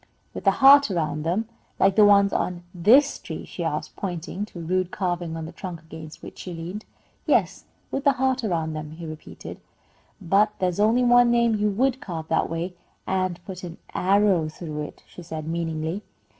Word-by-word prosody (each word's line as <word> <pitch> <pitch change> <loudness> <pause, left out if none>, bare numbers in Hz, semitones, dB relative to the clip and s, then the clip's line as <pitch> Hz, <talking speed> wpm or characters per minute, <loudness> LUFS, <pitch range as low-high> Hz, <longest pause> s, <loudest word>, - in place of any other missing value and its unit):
"With - - -7
a - - +8
heart 280 -1 +7
around 155 -5 -1
them, 180 +8 -1 0.3
like 195 0 +4
the 215 - +7
ones 200 -1 +5
on 175 -1 -2
this 240 - +4
tree?" - - -7
she - - -6
asked, - - -3
pointing 180 +1 -4
to 210 - -14
a - - -5
rude 185 +2 0
carving 175 -3 -2
on 160 - -5
the 160 - -8
trunk 175 -1 -7
against 160 -1 -11
which - - -10
she 180 -2 -6
leaned. 175 +6 -6 0.4
"Yes, - - +1 0.3
with 275 +2 -1
a 280 - +6
heart 260 -1 0
around 165 -6 -1
them," 155 0 -6
he 165 +1 -8
repeated. 155 -1 -9 0.6
"But 200 +3 +2
there's 180 0 -1
only 225 +4 +4
one 245 0 +6
name 235 -1 +3
you 210 0 +1
would 260 +6 0
carve 165 - -6
that 160 - +1
way, 165 +3 -3 0.3
and 185 -2 -1
put 185 -1 -8
an 170 -2 -7 0.2
arrow 190 -4 +3
through 155 -1 -6
it," - - -16
she - - -12
said, 160 -2 -6
meaningly. 165 +2 -2
185 Hz, 190 wpm, -24 LUFS, 165-210 Hz, 0.6 s, a